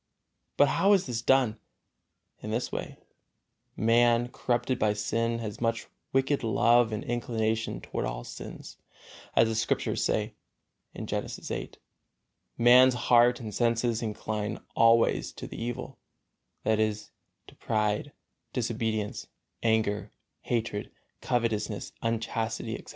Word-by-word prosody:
But 145 Hz, -, +6 dB
how 195 Hz, +8 st, +4 dB
is 190 Hz, -2 st, +3 dB
this 120 Hz, -3 st, -3 dB
done? 120 Hz, -4 st, +3 dB, 0.8 s
In 105 Hz, -, -6 dB
this 115 Hz, +3 st, -2 dB
way: -, -, -5 dB, 0.8 s
Man, 120 Hz, +1 st, +3 dB
corrupted 120 Hz, +1 st, -1 dB
by 105 Hz, -1 st, +2 dB
sin, 115 Hz, +2 st, -1 dB
has 110 Hz, -2 st, -6 dB
much 115 Hz, -1 st, 0 dB, 0.3 s
wicked 135 Hz, +1 st, +1 dB
love 115 Hz, +1 st, +4 dB
and 110 Hz, -, -3 dB
inclination 115 Hz, -, -1 dB
toward -, -, -3 dB
all -, -, -4 dB
sins, -, -, -9 dB, 0.6 s
as 115 Hz, -, +5 dB
the 110 Hz, -, -1 dB
Scriptures 110 Hz, -, 0 dB
say, -, -, 0 dB, 0.7 s
Genesis -, -, -4 dB
viii, -, -, -4 dB, 0.8 s
"Man's 125 Hz, +2 st, +7 dB
heart 120 Hz, 0 st, +4 dB
and 110 Hz, -3 st, -6 dB
senses 115 Hz, 0 st, +1 dB
incline 105 Hz, -1 st, -3 dB, 0.2 s
always 115 Hz, 0 st, +4 dB
to -, -, -8 dB
the -, -, -8 dB
evil," 120 Hz, 0 st, -5 dB, 0.6 s
that 110 Hz, -1 st, +2 dB
is, 105 Hz, -1 st, -1 dB, 0.3 s
to -, -, -15 dB
pride, 105 Hz, +5 st, -1 dB, 0.4 s
disobedience, 110 Hz, -3 st, -2 dB, 0.3 s
anger, 110 Hz, -2 st, +1 dB, 0.3 s
hatred, 115 Hz, -3 st, -2 dB, 0.3 s
covetousness, 115 Hz, -4 st, -1 dB
unchastity, 115 Hz, 0 st, -2 dB
etc. -, -, -8 dB
115 Hz, 120 wpm, -28 LUFS, 110-120 Hz, 0.8 s, Man's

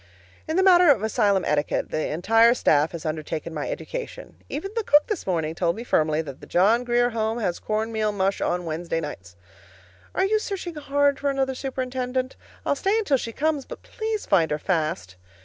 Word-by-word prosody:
In 315 Hz, +2 st, -1 dB
the 380 Hz, -, +4 dB
matter 360 Hz, -3 st, +6 dB
of 240 Hz, -8 st, +4 dB
asylum 205 Hz, -3 st, +2 dB
etiquette, 150 Hz, 0 st, 0 dB
the 155 Hz, -, -1 dB
entire 225 Hz, +9 st, +4 dB
staff 150 Hz, -8 st, +3 dB
has 170 Hz, -1 st, -7 dB
undertaken 155 Hz, +1 st, -4 dB
my 150 Hz, -2 st, -3 dB
education. -, -, -6 dB
Even 390 Hz, +7 st, -4 dB
the 455 Hz, -, 0 dB
cook 295 Hz, -5 st, +5 dB
this 420 Hz, -, -4 dB
morning 160 Hz, -4 st, -1 dB
told 170 Hz, 0 st, 0 dB
me 230 Hz, -, -6 dB
firmly 155 Hz, -7 st, +1 dB
that 140 Hz, -3 st, -9 dB
the -, -, -11 dB
John 215 Hz, +7 st, +3 dB
Grier 245 Hz, 0 st, +2 dB
Home 225 Hz, 0 st, -1 dB
has 190 Hz, -7 st, -2 dB
corn 220 Hz, +1 st, -2 dB
meal 215 Hz, -1 st, 0 dB
mush 195 Hz, -1 st, -1 dB
on 180 Hz, 0 st, -1 dB
Wednesday 165 Hz, +1 st, -2 dB
nights. 95 Hz, -, -8 dB, 0.8 s
Are 380 Hz, -, +2 dB
you 430 Hz, +2 st, +2 dB
searching 380 Hz, -4 st, -5 dB
hard 285 Hz, -2 st, +1 dB
for 285 Hz, -, 0 dB
another 270 Hz, -1 st, 0 dB
superintendent? 255 Hz, -1 st, -3 dB, 0.3 s
I'll -, -, +2 dB
stay 390 Hz, +9 st, +1 dB
until 350 Hz, -12 st, +2 dB
she 230 Hz, -, -5 dB
comes, 300 Hz, +3 st, -1 dB
but -, -, -9 dB
please 440 Hz, -2 st, -4 dB
find 170 Hz, -5 st, +3 dB
her 150 Hz, -, 0 dB
fast. 155 Hz, -, -2 dB
225 Hz, 195 wpm, -24 LUFS, -, 0.8 s, matter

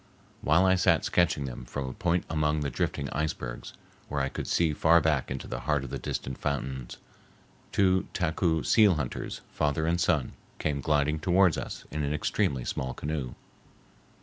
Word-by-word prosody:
While 80 Hz, +5 st, +4 dB
I 95 Hz, -, +5 dB
sat 90 Hz, -, +3 dB
sketching 80 Hz, -5 st, +2 dB
them 60 Hz, -2 st, -6 dB
from 65 Hz, +2 st, -5 dB
a 65 Hz, -, -5 dB
point 90 Hz, -4 st, 0 dB
among 75 Hz, -1 st, 0 dB
the 70 Hz, -2 st, -2 dB
drifting 70 Hz, +2 st, -2 dB
icebergs 70 Hz, -5 st, -3 dB, 0.3 s
where 75 Hz, -, -2 dB
I 70 Hz, 0 st, 0 dB
could -, -, -5 dB
see 80 Hz, -3 st, +2 dB
far 85 Hz, +3 st, +5 dB
back 75 Hz, -5 st, +1 dB
into 65 Hz, -1 st, -4 dB
the -, -, -4 dB
heart 75 Hz, 0 st, 0 dB
of 65 Hz, -, -7 dB
their -, -, -3 dB
distant 65 Hz, 0 st, -4 dB
fountains, 65 Hz, -3 st, -3 dB, 0.7 s
two 95 Hz, -1 st, +3 dB
Taku 80 Hz, -2 st, 0 dB
seal 105 Hz, -5 st, +5 dB
hunters, 70 Hz, -5 st, -4 dB
father 75 Hz, +1 st, 0 dB
and 85 Hz, +2 st, +1 dB
son, 80 Hz, -6 st, +1 dB, 0.3 s
came 70 Hz, -2 st, -1 dB
gliding 75 Hz, +2 st, +1 dB
toward 90 Hz, 0 st, +4 dB
us -, -, -6 dB
in 75 Hz, +2 st, -2 dB
an 75 Hz, +1 st, 0 dB
extremely 65 Hz, -3 st, 0 dB
small 65 Hz, -1 st, -3 dB
canoe. 75 Hz, -4 st, -4 dB
75 Hz, 175 wpm, -28 LUFS, 70-85 Hz, 0.7 s, I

